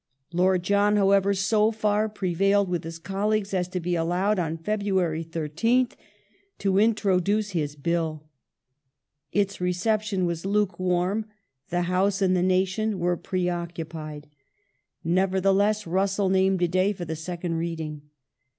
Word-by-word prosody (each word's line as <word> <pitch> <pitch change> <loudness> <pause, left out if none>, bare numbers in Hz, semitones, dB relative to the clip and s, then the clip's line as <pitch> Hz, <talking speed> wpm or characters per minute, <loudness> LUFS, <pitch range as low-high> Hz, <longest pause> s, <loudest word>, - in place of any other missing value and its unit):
Lord 180 +1 +2
John, 205 +2 +3
however, 200 -1 +4
so 210 +2 +2
far 215 -1 0
prevailed 195 0 +1
with 175 -2 -2
his 165 0 -6
colleagues 200 +3 -1
as 180 -2 0
to 180 0 -3
be 175 +1 -2
allowed, 180 +5 +1
on 165 -1 -2
February 190 -3 -1
13th, 165 +11 0 0.6
to 195 -1 +1
introduce 205 -1 +2
his 150 -5 -2
Bill. 155 0 -2 1.0
Its 200 -1 0
reception 195 +2 0
was 170 -1 -2
lukewarm; 190 0 0 0.4
the 175 0 0
House 190 +3 +1
and 185 -2 +2
the 180 - +2
nation 190 +3 +1
were 175 0 +1
preoccupied. 165 -4 -4 0.8
Nevertheless 195 +4 +2
Russell 195 +2 +1
named 190 -1 +2
a - - +4
day 185 +4 +1
for 180 -3 -6
the 160 0 -4
second 170 +1 -4
reading. 160 -3 -5
185 Hz, 130 wpm, -25 LUFS, 170-200 Hz, 1.0 s, however